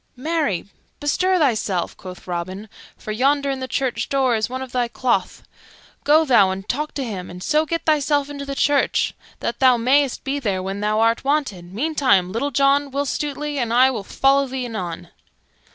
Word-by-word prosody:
"Marry, 295 - -1 0.3
bestir 370 +6 +1
thyself," 215 - 0
quoth 185 -1 -11
Robin, 185 +4 -5 0.3
"for 215 - -7
yonder, 280 +5 +1
in 270 - -3
the 260 - -4
church 260 -2 -2
door, 265 -3 +2
is 220 +1 -1
one 260 +1 -4
of 260 - -10
thy 245 -1 0
cloth. 235 -5 -1 0.6
Go 310 +2 +4
thou 235 -9 +5
and 190 +1 -5
talk 300 +4 -3
to 275 - -2
him, 195 -7 -5
and 180 +1 -9
so 310 +1 +2
get 330 +1 -2
thyself 290 -2 +2
into 285 -1 -6
the 275 0 -5
church, 285 0 +2 0.3
that 235 - -3
thou 255 -2 +5
mayst 265 +3 +2
be 280 +1 -2
there 195 -8 -2
when 195 +1 -4
thou 210 +1 0
art 230 +1 +2
wanted; 265 -12 -1
meantime, 255 - +1
Little 235 +7 -1
John, 280 +1 +2
Will 280 +1 -2
Stutely, 295 +1 -3
and 235 -2 -1
I 255 +3 +5
will 220 -6 -4
follow 275 +6 +2
thee 260 -1 -4
anon." 180 -7 -5
260 Hz, 185 wpm, -21 LUFS, 210-285 Hz, 0.6 s, thou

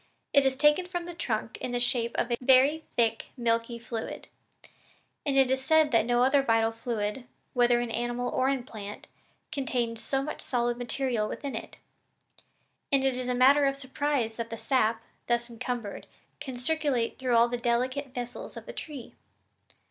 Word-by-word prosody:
It 280 -2 +6
is 265 0 0
taken 300 +5 +4
from 350 -1 -4
the 350 - -7
trunk 225 -9 -3
in 245 - -3
the 245 - +1
shape 240 -1 +1
of 240 - 0
a 240 - +2
very 270 +5 +5
thick 225 -1 +1
milky 230 0 0
fluid, 230 -1 -6 1.0
and 275 -1 +2
it 265 -1 +5
is 265 0 0
said 315 +1 +4
that 230 -1 +3
no 240 0 +3
other 270 +2 +4
vital 225 -3 +2
fluid, 225 +1 -3 0.3
whether 245 -1 +4
in 240 -1 -2
animal 240 +1 -2
or 260 +1 +2
in 270 -3 0
plant, 210 -4 -8 0.5
contains 240 -4 -2
so 270 0 0
much 305 - -5
solid 240 -1 -1
material 245 -3 -1
within 280 -2 -5
it; - - -7 1.1
and 275 -1 +3
it 270 -1 +2
is 250 0 -4
a 250 - 0
matter 275 +3 +6
of 275 - 0
surprise 270 -4 -1
that 230 -1 -4
the 230 - -5
sap, 225 -3 +1 0.2
thus 240 0 0
encumbered, 235 -2 -5 0.3
can 260 -3 -6
circulate 265 -3 0
through 255 -2 +1
all 235 +1 +6
the 245 - -2
delicate 255 +4 0
vessels 245 -2 -6
of - - -8
the - - -8
tree. 285 -6 -7
245 Hz, 180 wpm, -28 LUFS, 235-270 Hz, 1.1 s, It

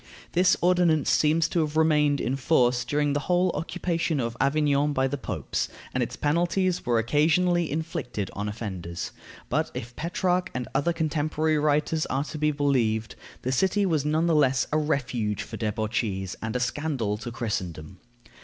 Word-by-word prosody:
This 180 +1 +4
ordinance 175 -4 +3
seems 160 +1 +3
to 175 - 0
have 155 -1 -1
remained 150 -3 +3
in 130 - -1
force 125 -3 +2
during 145 +3 0
the 145 - +1
whole 180 0 +3
occupation 165 0 -1
of 115 -1 -2
Avignon 145 +1 +2
by 130 -1 +2
the 140 - -2
Popes, 140 - -3 0.2
and - - 0
its - - -2
penalties 175 +3 0
were 120 -1 +3
occasionally 160 +8 +2
inflicted 150 - -3
on 105 +1 -3
offenders. 95 -6 -5 0.4
But - - 0
if 120 +2 -6
Petrarch 180 +2 0
and 125 -1 -3
other 140 +5 +2
contemporary 155 -1 0
writers 150 +1 +1
are 135 +2 0
to 155 +1 -7
be 150 0 +2
believed, 125 -7 0 0.3
the 130 - -1
city 190 +8 +2
was 160 -6 +1
none 155 +2 +1
the 170 - +2
less 135 -4 +3
a 155 - +2
refuge 120 -8 -1
for 110 - -8
debauchees, 105 -3 -2
and 110 +1 -4
a - - +1
scandal 125 -4 -1
to 120 +2 -6
Christendom. 90 -7 -4
145 Hz, 165 wpm, -26 LUFS, 120-160 Hz, 0.4 s, This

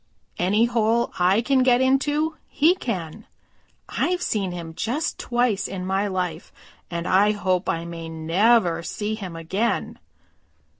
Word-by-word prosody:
Any 205 +6 +3
hole 235 0 +1
I 185 +5 +4
can 265 +2 +2
get 250 -1 +4
into 290 +4 +1
he 315 +4 +3
can. 205 - -5 0.6
I've 360 0 -1
seen 195 -4 -1
him 170 -2 -7
just 250 - -2
twice 240 -5 0
in 185 -1 -5
my 195 +2 0
life, 180 -4 -3 0.4
and 170 0 -4
I 205 +3 +4
hope 185 -2 0
I 165 0 -1
may 165 -1 -7
never 170 +3 +2
see 210 +5 -3
him 190 -6 -6
again." 190 +8 -2
205 Hz, 140 wpm, -23 LUFS, 175-240 Hz, 0.6 s, I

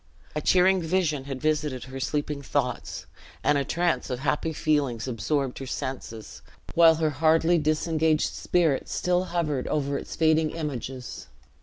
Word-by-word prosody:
A 150 - -1
cheering 185 +2 +4
vision 160 -5 0
had 135 -2 -5
visited 150 -3 -1
her 135 0 -8
sleeping 145 +1 -2
thoughts; - - -2 0.4
and 145 - +3
a 140 - +1
trance 165 -1 0
of 125 0 -3
happy 150 +3 0
feelings 145 -7 0
absorbed 130 +3 -1
her 135 - -6
senses, 120 -4 -6 0.3
while 165 -1 +7
her 160 -1 0
hardly 165 +3 +3
disengaged 155 0 +1
spirit 165 -6 +1
still 180 +1 0
hovered 155 -7 -1
over 140 -2 -1
its - - -8
fading 160 -1 +3
images. 135 -5 -5
150 Hz, 145 wpm, -26 LUFS, 135-160 Hz, 0.4 s, while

